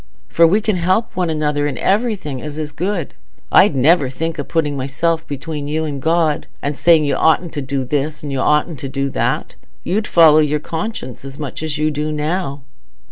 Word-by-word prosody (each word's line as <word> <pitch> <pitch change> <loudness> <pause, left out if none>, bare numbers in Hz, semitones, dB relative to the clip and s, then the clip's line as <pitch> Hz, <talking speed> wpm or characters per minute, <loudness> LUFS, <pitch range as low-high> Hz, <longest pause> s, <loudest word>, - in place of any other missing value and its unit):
For 165 0 +5
we 200 +6 +2
can 215 -3 0
help 185 +6 0
one 180 -2 0
another 150 -2 0
in 135 -4 -4
everything 195 - -1
as 150 0 -6
is 155 -1 -4
good. 175 +1 -3 0.4
I'd 185 -5 +5
never 140 +1 +4
think 160 +5 -4
o' - - -1
putting 150 -1 -1
myself 160 +5 -1
between 145 +1 -5
you 155 +2 -1
and 140 -3 -4
God, 160 -1 +1
and 145 +1 -3
saying 160 0 +4
you 145 - +1
oughtn't 160 +1 +2
to 145 - -3
do 135 0 -2
this 150 +3 -2
and 145 - -4
you 135 - -2
oughtn't 150 +1 +1
to 135 - -5
do 140 0 -2
that. - - -1 0.3
You'd 210 +3 -1
follow 160 -2 +6
your 150 0 +1
conscience 160 - -5
as 135 0 -9
much 145 -2 -6
as 155 -2 -3
you 155 +1 +1
do 150 +1 -2
now." 150 -2 -2
150 Hz, 200 wpm, -18 LUFS, 145-165 Hz, 0.4 s, follow